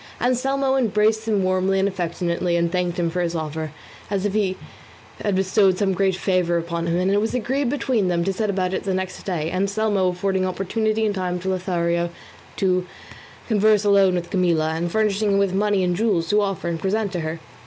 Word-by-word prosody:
Anselmo 265 Hz, +2 st, +1 dB
embraced 220 Hz, -2 st, +1 dB
him 205 Hz, -3 st, +1 dB
warmly 185 Hz, +1 st, +1 dB
and 195 Hz, +1 st, +2 dB
affectionately, 175 Hz, -1 st, -1 dB
and 170 Hz, 0 st, +1 dB
thanked 180 Hz, -1 st, -1 dB
him 170 Hz, -2 st, 0 dB
for 180 Hz, -, -1 dB
his 170 Hz, -1 st, -1 dB
offer 155 Hz, -1 st, -4 dB, 0.4 s
as 200 Hz, -1 st, -1 dB
if 205 Hz, -, -1 dB
he 195 Hz, -3 st, 0 dB, 0.7 s
had 205 Hz, -2 st, +1 dB
bestowed 190 Hz, 0 st, +3 dB
some 195 Hz, -1 st, +1 dB
great 190 Hz, 0 st, +1 dB
favour 180 Hz, -2 st, +1 dB
upon 170 Hz, 0 st, -3 dB
him; 170 Hz, +1 st, +1 dB
and 185 Hz, +2 st, +1 dB
it 205 Hz, +1 st, +3 dB
was 225 Hz, +3 st, -1 dB
agreed 255 Hz, +3 st, 0 dB
between 250 Hz, -7 st, 0 dB
them 170 Hz, -1 st, +1 dB
to 195 Hz, +2 st, 0 dB
set 210 Hz, +2 st, -1 dB
about 185 Hz, -2 st, -1 dB
it -, -, -1 dB
the 190 Hz, -2 st, -1 dB
next 185 Hz, 0 st, -4 dB
day, 165 Hz, -3 st, -2 dB
Anselmo 200 Hz, +1 st, +1 dB
affording 185 Hz, +1 st, 0 dB
opportunity 215 Hz, +4 st, -1 dB
and 210 Hz, -, 0 dB
time 180 Hz, -2 st, -2 dB
to 190 Hz, -, -2 dB
Lothario 175 Hz, -2 st, 0 dB, 0.5 s
to 185 Hz, -1 st, +1 dB, 0.6 s
converse 215 Hz, -1 st, +3 dB
alone 195 Hz, -2 st, +4 dB
with 175 Hz, -1 st, -4 dB
Camilla, 170 Hz, -4 st, +1 dB
and 170 Hz, +2 st, -2 dB
furnishing 210 Hz, -1 st, +1 dB
him -, -, +3 dB
with 200 Hz, -2 st, +1 dB
money 200 Hz, -1 st, +1 dB
and 180 Hz, -1 st, +1 dB
jewels 185 Hz, -5 st, 0 dB
to 210 Hz, 0 st, +3 dB
offer 195 Hz, -4 st, -2 dB
and 170 Hz, -1 st, -2 dB
present 200 Hz, +3 st, -1 dB
to 180 Hz, -, -3 dB
her. 160 Hz, 0 st, -4 dB
190 Hz, 205 wpm, -22 LUFS, 175-210 Hz, 0.7 s, alone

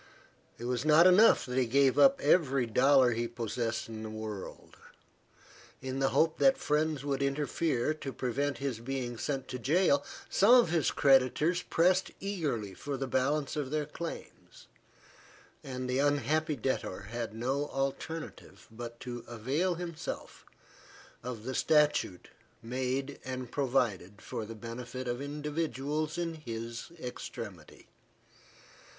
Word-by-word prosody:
It 120 Hz, -, -7 dB
was 125 Hz, 0 st, -1 dB
not 155 Hz, +2 st, +6 dB
enough 190 Hz, +5 st, +6 dB
that 125 Hz, +1 st, -1 dB
he 125 Hz, -, +2 dB
gave 135 Hz, +2 st, +3 dB
up 275 Hz, 0 st, +6 dB
every 135 Hz, -7 st, +3 dB
dollar 130 Hz, +2 st, +5 dB
he 120 Hz, +1 st, -1 dB
possessed 115 Hz, 0 st, -3 dB
in 110 Hz, -1 st, -7 dB
the 110 Hz, -, -5 dB
world. 110 Hz, -2 st, -7 dB, 1.0 s
In 130 Hz, 0 st, -4 dB
the 135 Hz, 0 st, +3 dB
hope 160 Hz, +2 st, +2 dB
that 270 Hz, 0 st, +5 dB
friends 150 Hz, -, 0 dB
would 140 Hz, -1 st, -1 dB
interfere 145 Hz, 0 st, 0 dB
to 145 Hz, -3 st, -6 dB
prevent 135 Hz, +2 st, -1 dB
his 135 Hz, -3 st, -3 dB
being 120 Hz, -1 st, -4 dB
sent 135 Hz, 0 st, -2 dB
to 125 Hz, -, -4 dB
jail, 145 Hz, +2 st, +3 dB, 0.2 s
some 220 Hz, +6 st, +6 dB
of 240 Hz, -9 st, +5 dB
his 165 Hz, -3 st, +2 dB
creditors 140 Hz, +6 st, +3 dB
pressed 180 Hz, +3 st, +2 dB
eagerly 150 Hz, -, -2 dB
for 140 Hz, +8 st, -5 dB
the 135 Hz, -, -2 dB
balance 140 Hz, +3 st, 0 dB
of 145 Hz, -3 st, -2 dB
their 150 Hz, +1 st, -1 dB
claims, 165 Hz, +3 st, -8 dB, 1.0 s
and 130 Hz, -1 st, -5 dB
the 125 Hz, +1 st, 0 dB
unhappy 145 Hz, +2 st, +1 dB
debtor 130 Hz, -3 st, -2 dB
had 115 Hz, -2 st, -4 dB
no 135 Hz, +5 st, -1 dB
alternative 135 Hz, +4 st, -5 dB
but 120 Hz, +1 st, -8 dB
to 120 Hz, -2 st, -6 dB
avail 135 Hz, +11 st, -1 dB
himself 170 Hz, -1 st, -6 dB, 0.8 s
of 120 Hz, -3 st, -6 dB
the 130 Hz, +2 st, -4 dB
statute 150 Hz, -, +2 dB, 0.3 s
made 130 Hz, +3 st, -2 dB
and 130 Hz, -2 st, -5 dB
provided 115 Hz, -8 st, 0 dB
for 110 Hz, -, -5 dB
the 115 Hz, -, -7 dB
benefit 120 Hz, +3 st, -6 dB
of 120 Hz, +2 st, -2 dB
individuals 150 Hz, +1 st, -2 dB
in 170 Hz, -1 st, -2 dB
his 115 Hz, -3 st, -6 dB
extremity. 105 Hz, -, -8 dB
135 Hz, 135 wpm, -31 LUFS, 120-150 Hz, 1.0 s, not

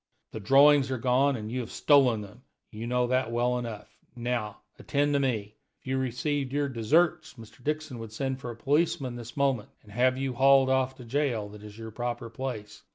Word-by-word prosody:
"The 110 Hz, -, -6 dB
drawings 135 Hz, +5 st, +5 dB
are 130 Hz, -, -1 dB
gone, 130 Hz, +3 st, +2 dB
and 110 Hz, -2 st, -6 dB
you 130 Hz, -, -2 dB
have 120 Hz, -, -5 dB
stolen 130 Hz, -7 st, +4 dB
them; 105 Hz, +4 st, -12 dB, 0.3 s
you 110 Hz, +2 st, -6 dB
know 125 Hz, 0 st, +1 dB
that 130 Hz, -1 st, 0 dB
well 120 Hz, +1 st, +1 dB
enough. 115 Hz, -4 st, -8 dB, 0.2 s
Now 120 Hz, -4 st, -3 dB, 0.2 s
attend 145 Hz, +1 st, 0 dB
to 140 Hz, -, +3 dB
me. 110 Hz, -6 st, -2 dB, 0.2 s
If -, -, -37 dB
you 130 Hz, 0 st, -1 dB
received 130 Hz, +2 st, -2 dB
your 145 Hz, 0 st, 0 dB
deserts, 155 Hz, +7 st, +1 dB
Mr. 115 Hz, +1 st, -14 dB
Dixon 150 Hz, -3 st, -3 dB
would 115 Hz, -1 st, -8 dB
send 135 Hz, +3 st, -3 dB
for 125 Hz, -, -6 dB
a 120 Hz, -, -6 dB
policeman 140 Hz, 0 st, 0 dB
this 120 Hz, +1 st, -9 dB
moment, 135 Hz, -6 st, +1 dB
and 105 Hz, -, -16 dB
have 130 Hz, +4 st, +2 dB
you 135 Hz, -1 st, -2 dB
hauled 135 Hz, +1 st, +5 dB
off 130 Hz, 0 st, +1 dB
to 125 Hz, -, -11 dB
the -, -, -14 dB
jail 120 Hz, -5 st, -1 dB
that 105 Hz, 0 st, -12 dB
is 105 Hz, 0 st, -11 dB
your 110 Hz, -1 st, -8 dB
proper 120 Hz, 0 st, -4 dB
place. 110 Hz, -4 st, -6 dB
125 Hz, 210 wpm, -28 LUFS, 115-135 Hz, 0.3 s, drawings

